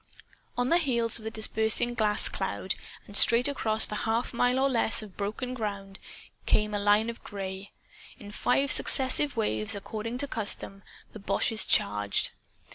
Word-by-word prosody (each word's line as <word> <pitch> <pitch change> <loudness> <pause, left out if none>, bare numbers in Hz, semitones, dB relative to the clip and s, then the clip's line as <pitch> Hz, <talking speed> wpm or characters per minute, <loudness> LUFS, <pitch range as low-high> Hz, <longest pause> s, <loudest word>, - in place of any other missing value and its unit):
On 245 +1 0
the 340 - +3
heels 235 -7 -1
of 220 - -13
the - - -3
dispersing 220 +1 +3
gas 215 -3 +1
cloud, 190 0 -3 0.3
and 205 - -13
straight 235 +5 +6
across 220 -6 +3
the - - -8 0.2
half 230 +3 -1
mile 245 +1 +1
or 270 +1 +2
less 230 -4 +1
of 200 -3 -13
broken 215 +5 -4
ground, 200 -4 -6 0.5
came 210 0 +1
a 205 - -1
line 205 +2 +2
of 235 0 -7
gray. 195 0 -7 0.5
In 205 - -12
five 270 +5 +1
successive 265 +1 +2
waves, 215 -1 -1
according 220 +4 -6
to 285 - +1
custom, 200 -4 -4 0.3
the 215 - -10
boches 205 +2 0
charged. 105 0 +1
220 Hz, 160 wpm, -27 LUFS, 205-245 Hz, 0.5 s, straight